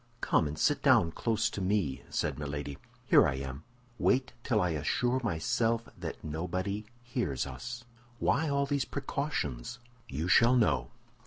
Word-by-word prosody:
"Come 80 - +2
and 75 +1 -5
sit 145 - +2
down 120 - +5
close 110 +3 0
to 100 - -4
me," 95 -7 0
said 75 -2 -1
Milady. 70 -1 -4 0.3
"Here - - +6
I 65 - -1
am." 65 +2 -6 0.4
"Wait 130 0 +2
till 110 -4 +2
I 90 -3 +1
assure 120 - 0
myself 115 +5 0
that - - -6
nobody 90 +7 -3 0.2
hears 120 - -2
us." 120 0 -7 0.3
"Why 155 +6 +1
all 140 0 +2
these 140 -1 0
precautions?" 130 - -3 0.3
"You 75 +5 -2
shall 115 +7 +6
know." 120 -4 +2
105 Hz, 150 wpm, -31 LUFS, 75-125 Hz, 0.4 s, Here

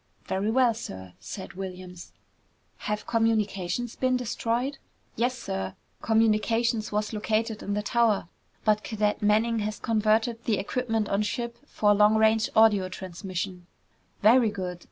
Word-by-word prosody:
"Very 195 +3 -1
well, 245 0 +4
sir," 95 - -8
said 190 - -8
Williams. 185 -1 -8 0.7
"Have 210 0 -3
communications 220 -1 0
been 255 -1 +1
destroyed?" 245 +3 -2 0.4
"Yes, 245 +3 0
sir. 95 - -4 0.3
Communications 225 0 +2
was 210 +1 -1
located 220 +1 -1
in 200 - -3
the 210 - -1
tower, 225 -5 +2 0.4
but 215 -1 +3
Cadet 210 -2 -1
Manning 220 +2 +2
has 210 0 -3
converted 225 +1 +1
the 215 -3 +1
equipment 225 0 -1
on 200 +1 +1
ship 235 +2 -3
for 210 -7 +3
long 210 +1 +5
range 220 0 +3
audio 210 -4 +5
transmission." 185 0 -6 0.6
"Very 230 +2 +6
good!" 185 -4 -5
215 Hz, 135 wpm, -27 LUFS, 200-230 Hz, 0.7 s, Very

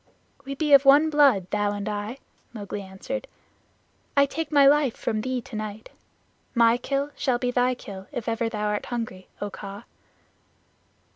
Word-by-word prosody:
"We 275 0 -5
be 300 0 +1
one 285 +3 +5
blood, 275 - +4
thou 205 0 +1
and 205 0 -4
I," 210 +4 -4 0.4
Mowgli 205 -2 -6
answered. 190 +7 -6 0.9
"I 280 - +7
take 315 +2 -4
my 285 -2 +6
life 280 -3 +4
from 215 -1 -2
thee 255 +1 -2
tonight. 215 -2 -7 0.6
My 235 0 +5
kill 275 +3 -2
shall 255 -3 0
be 245 0 -1
thy 250 0 +2
kill 195 -5 -10
if 245 - -5
ever 230 0 0
thou 210 -2 -3
art 210 0 -2
hungry, 225 -6 -5
O 205 0 -3
Kaa." 200 +3 -8
235 Hz, 155 wpm, -25 LUFS, 205-275 Hz, 0.9 s, I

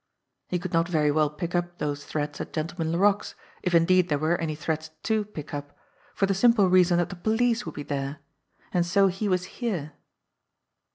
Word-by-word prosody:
He 180 - -1
could 180 +1 -6
not 165 0 +3
very 155 -4 +2
well 155 0 +2
pick 170 +3 -5
up 175 0 -1
those 145 -1 -3
threads 150 -1 -3
at - - -7
Gentleman 160 +1 -2
Laroque's, 200 +4 +2 0.3
if 180 -2 +1
indeed 180 +2 +4
there 145 - +2
were 155 +4 +1
any 155 -2 -2
threads 155 0 -3
to 220 -1 +1
pick 155 -9 -9
up, 145 0 -6 0.4
for 195 - +2
the 195 - +1
simple 215 0 +4
reason 180 -1 +5
that 175 - +1
the - - -6
police 230 +5 +1
would - - -6
be 145 - -5
there! 140 0 -3 0.6
And 175 - +3
so 195 +3 +3
he 195 +3 -2
was 180 -1 +1 0.2
here. 180 -11 -2
175 Hz, 195 wpm, -26 LUFS, 155-190 Hz, 0.6 s, reason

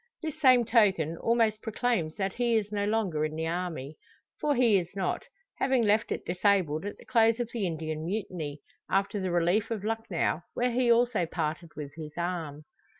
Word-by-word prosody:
This 310 -1 -5
same 255 -4 +6
token 195 -9 +3
almost 225 -1 +1
proclaims 220 -8 -1
that 195 -1 -2
he 240 -1 +1
is 210 -2 0
no 205 -1 0
longer 205 -8 0
in 155 0 -2
the 160 +1 -2
army. 165 -4 -4 0.4
For 295 -1 +1
he 235 -6 +4
is 175 -1 -5
not 190 -2 -2 0.3
having 265 -3 +2
left 215 +1 +2
it - - -3
disabled 180 -3 +1
at 205 - -6
the - - -16
close 230 -2 +3
of 240 -2 -3
the 215 -6 -1
Indian 155 -1 -4
Mutiny: 170 -7 -4 0.3
after 195 +1 +1
the 190 -1 -2
relief 175 +5 +2
of 220 -4 -3
Lucknow, 220 -7 -1
where 250 +1 +1
he 240 0 +3
also 235 -6 +3
parted 165 +1 -3
with 145 -2 -6
his 155 -2 -8
arm. 165 -4 -3
195 Hz, 185 wpm, -29 LUFS, 165-230 Hz, 0.4 s, same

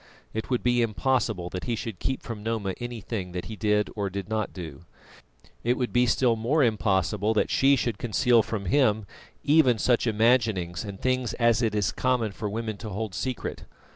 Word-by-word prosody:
It 110 - -4
would 125 -2 0
be 120 0 +3
impossible 110 -5 0
that 90 - -5
he 120 - -1
should 110 -4 -6
keep 130 - -2
from 115 -3 -6
Noma 110 -3 -2
anything 115 -6 -5
that 90 - -4
he 110 - -6
did 105 0 +1
or 100 -2 -1
did 100 0 -5
not 110 -1 -1
do; 85 -1 -8 0.8
it 120 +2 +1
would 125 -2 -2
be 125 0 +4
still 120 0 +3
more 130 +7 +2
impossible 105 -1 +1
that - - +1
she 140 +1 +5
should 120 -5 -2
conceal 120 +1 +3
from 105 -2 -4
him 110 -1 +2 0.4
even 145 -5 +4
such 120 +2 +2
imaginings 110 -6 +2
and 100 -2 -7
things 130 -3 0
as 115 -1 +2
it 110 -3 0
is 105 -2 +1
common 125 -4 0
for 105 +2 -4
women 110 0 -4
to 110 - -7
hold 105 0 -4
secret. 130 +4 -4
110 Hz, 190 wpm, -26 LUFS, 105-120 Hz, 0.8 s, she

